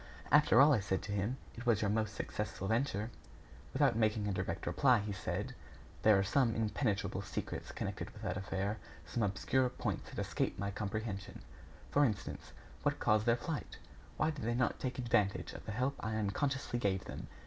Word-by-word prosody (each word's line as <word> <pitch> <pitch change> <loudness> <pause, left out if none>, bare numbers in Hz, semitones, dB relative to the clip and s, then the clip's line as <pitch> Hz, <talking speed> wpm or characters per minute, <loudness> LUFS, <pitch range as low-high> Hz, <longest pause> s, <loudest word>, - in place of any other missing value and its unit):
"After 145 -5 +6
all," 145 +2 +8
I 120 - +4
said 95 -2 -1
to 105 - -5
him, 105 +6 0 0.2
"it 120 +1 -7
was 115 -4 +4
your 105 - +2
most 110 -1 0
successful 105 -2 -3
venture." 110 -1 0 0.6
Without - - +3
making 110 -2 +2
a 100 - 0
direct 95 -2 -2
reply, 130 -4 +4
he 105 0 -2
said: 95 -4 -3 0.5
"There 105 -2 +6
are 95 - +3
some 115 +2 +2
impenetrable 110 -1 0
secrets - - -5
connected - - -4
with - - -12
that - - -1
affair; 100 +2 -2 0.3
some 85 +8 -2
obscure 115 +6 +2
points - - -3
that - - -10
escape - - -1
my 100 +1 -2
comprehension. 100 - -4 0.5
For 145 - +5
instance: 110 -7 -2 0.3
What - - +1
caused 110 +1 +3
their 115 0 +5
flight? 160 +1 -4 0.4
Why 160 - +2
did 150 -5 -6
they 120 +1 0
not 125 0 +1
take 130 -1 -3
advantage 105 -5 +1
of - - -10
the - - -2
help 130 +6 0
I 110 0 -2
unconsciously 120 +4 0
gave 95 -4 0
them? - - -6
110 Hz, 185 wpm, -35 LUFS, 100-125 Hz, 0.6 s, all